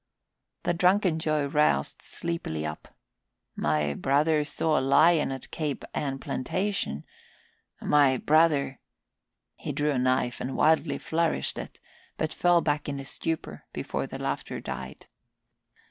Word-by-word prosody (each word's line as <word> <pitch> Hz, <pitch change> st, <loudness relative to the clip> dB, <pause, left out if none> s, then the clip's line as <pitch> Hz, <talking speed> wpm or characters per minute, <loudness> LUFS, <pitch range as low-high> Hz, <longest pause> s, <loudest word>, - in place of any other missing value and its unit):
The 175 Hz, -, +1 dB
drunken 180 Hz, -1 st, +3 dB
Joe 155 Hz, -2 st, +1 dB
roused 140 Hz, -, +1 dB
sleepily 165 Hz, -, -4 dB
up. 75 Hz, 0 st, -6 dB, 0.7 s
"My 75 Hz, -1 st, +1 dB
brother 150 Hz, -, +2 dB
saw 155 Hz, +1 st, 0 dB
a -, -, -1 dB
lion 155 Hz, +3 st, +4 dB
at 135 Hz, -1 st, -6 dB
Cape 150 Hz, -4 st, -3 dB
Ann 135 Hz, -2 st, -2 dB
plantation. 135 Hz, -, -2 dB, 0.7 s
My 140 Hz, -3 st, +4 dB
brother 150 Hz, -3 st, +3 dB, 0.4 s
" -, -, -58 dB, 0.3 s
He -, -, -4 dB
drew 150 Hz, +1 st, 0 dB
a 135 Hz, -, 0 dB
knife 125 Hz, -1 st, +1 dB
and 130 Hz, +1 st, -3 dB
wildly 155 Hz, -1 st, +3 dB
flourished 165 Hz, 0 st, -1 dB
it, -, -, -8 dB, 0.4 s
but 155 Hz, 0 st, -1 dB
fell 175 Hz, -1 st, +4 dB
back 145 Hz, -1 st, -1 dB
in 140 Hz, -1 st, -3 dB
a 135 Hz, -, -7 dB
stupor 160 Hz, +3 st, -4 dB
before -, -, -3 dB
the -, -, -6 dB
laughter -, -, -3 dB
died. -, -, -7 dB
150 Hz, 135 wpm, -27 LUFS, 135-160 Hz, 0.7 s, lion